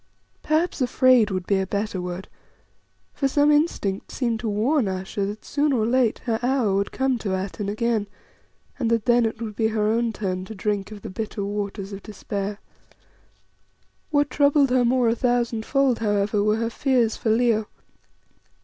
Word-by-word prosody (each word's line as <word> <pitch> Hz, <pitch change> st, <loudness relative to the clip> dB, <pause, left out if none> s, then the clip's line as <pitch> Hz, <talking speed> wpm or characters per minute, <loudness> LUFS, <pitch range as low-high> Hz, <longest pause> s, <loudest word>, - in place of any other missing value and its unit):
Perhaps 315 Hz, 0 st, 0 dB
"afraid" 255 Hz, -3 st, +4 dB
would 185 Hz, -2 st, -3 dB
be 195 Hz, 0 st, +2 dB
a 190 Hz, -, -2 dB
better 200 Hz, -1 st, -2 dB
word, 180 Hz, +1 st, -5 dB, 0.9 s
for 275 Hz, -, 0 dB
some 290 Hz, +2 st, +3 dB
instinct 295 Hz, -, 0 dB
seemed 235 Hz, -4 st, -1 dB
to 225 Hz, -, -2 dB
warn 230 Hz, +5 st, +1 dB
Ayesha 190 Hz, +1 st, -3 dB
that 210 Hz, +2 st, -7 dB
soon 290 Hz, +1 st, +1 dB
or 230 Hz, -5 st, +1 dB
late 240 Hz, -1 st, +2 dB
her 225 Hz, -2 st, 0 dB
hour 245 Hz, -5 st, +1 dB
would 200 Hz, +1 st, 0 dB
come 265 Hz, -2 st, 0 dB
to 195 Hz, -4 st, -2 dB
Atene 195 Hz, +2 st, -4 dB
again, 220 Hz, 0 st, 0 dB, 0.7 s
and 235 Hz, -4 st, 0 dB
that 230 Hz, -2 st, +1 dB
then 240 Hz, -1 st, +4 dB
it 225 Hz, 0 st, -6 dB
would 220 Hz, -3 st, -5 dB
be 220 Hz, 0 st, +1 dB
her 220 Hz, -1 st, -1 dB
own 230 Hz, +2 st, +1 dB
turn 185 Hz, -4 st, -3 dB
to 220 Hz, -, -9 dB
drink 205 Hz, 0 st, -2 dB
of 205 Hz, -2 st, -10 dB
the -, -, -6 dB
bitter 210 Hz, 0 st, -4 dB
waters 200 Hz, -1 st, -4 dB
of 195 Hz, -, -7 dB
despair. 200 Hz, 0 st, -5 dB, 1.5 s
What 290 Hz, -1 st, +1 dB
troubled 285 Hz, -2 st, +3 dB
her 255 Hz, -1 st, +4 dB
more 245 Hz, 0 st, +2 dB
a 225 Hz, -, +3 dB
thousandfold, 245 Hz, +2 st, +1 dB
however, 205 Hz, -1 st, +1 dB
were 210 Hz, +1 st, +2 dB
her 230 Hz, +1 st, -2 dB
fears 245 Hz, -3 st, +1 dB
for 225 Hz, -, -2 dB
Leo. 220 Hz, -1 st, +2 dB
220 Hz, 175 wpm, -24 LUFS, 205-250 Hz, 1.5 s, afraid